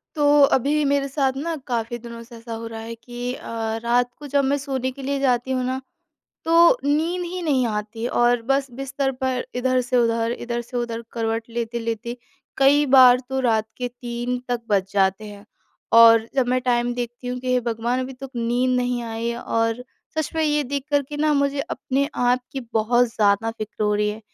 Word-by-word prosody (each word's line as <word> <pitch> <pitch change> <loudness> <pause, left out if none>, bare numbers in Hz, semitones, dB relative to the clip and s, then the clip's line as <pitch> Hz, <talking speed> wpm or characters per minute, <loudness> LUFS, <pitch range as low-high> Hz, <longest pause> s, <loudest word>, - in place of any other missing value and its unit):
तो 295 - +1 0.3
अभी 290 +4 +1
मेरे 280 0 +1
साथ 270 -1 0
ना 330 +4 -2
काफ़ी 240 -1 -2
दिनों 235 0 -9
से 235 +1 -14
ऐसा 230 0 -8
हो 225 0 -5
रहा 225 0 -7
है 225 +1 -6
कि 245 +1 -6
अ, - - -9 0.4
रात 245 +1 +2
को 295 - -8
जब 280 0 +2
मैं 275 +1 +1
सोने 265 -2 -3
के 275 +2 -11
लिए 280 +1 -1
जाती 255 -1 +1
हूँ 255 -1 0
ना 260 +1 -2 0.6
तो 335 +7 +6
नींद 320 +5 +1
ही 360 +1 -5
नहीं 270 -6 +2
आती 220 +1 -3
और 240 -1 +2
बस 275 -1 +1
बिस्तर 270 0 -1
पर 260 -1 -2
इधर 255 +1 +1
से 250 0 -1
उधर, 230 -1 +2
इधर 240 0 -4
से 240 +1 -8
उधर 235 -1 -3
करवट 225 -1 -2
लेते-लेते 230 0 -3 0.4
कई 280 +2 +5
बार 250 -1 +8
तो 265 0 -1
रात 220 -4 +1
के 250 -1 -2
3 245 0 -4
तक 245 -1 -1
बज 195 -1 +1
जाते 195 +1 +1
हैं। 205 0 -11 0.5
और 230 -1 +8
जब 265 -2 +2
मैं 255 +1 +2
टाइम 245 -1 +1
देखती 240 0 -5
हूँ 250 0 -3
कि 255 0 -1
हे 250 - +3
भगवान 235 +1 -1
अभी 260 +1 -5
तक 265 +1 -9
नींद 245 +2 +1
नहीं 245 -1 -1
आई 225 0 -4
है 235 0 -3
और 230 +1 -1 0.4
सच 310 -2 -1
में 320 - +1
ये 300 -1 +2
देख 275 +1 -3
कर 285 -1 +3
के 295 - -6
ना 305 +1 +2
मुझे 280 0 +1
अपने 275 0 -2 0.2
आप 250 +1 +3
की 270 - -3
बहुत 240 +3 +3
ज़्यादा 210 +1 +2
फ़िक्र 215 -1 -6
हो 210 0 +2
रही 210 0 +1
है 215 +1 -7
245 Hz, 205 wpm, -23 LUFS, 230-270 Hz, 0.6 s, बार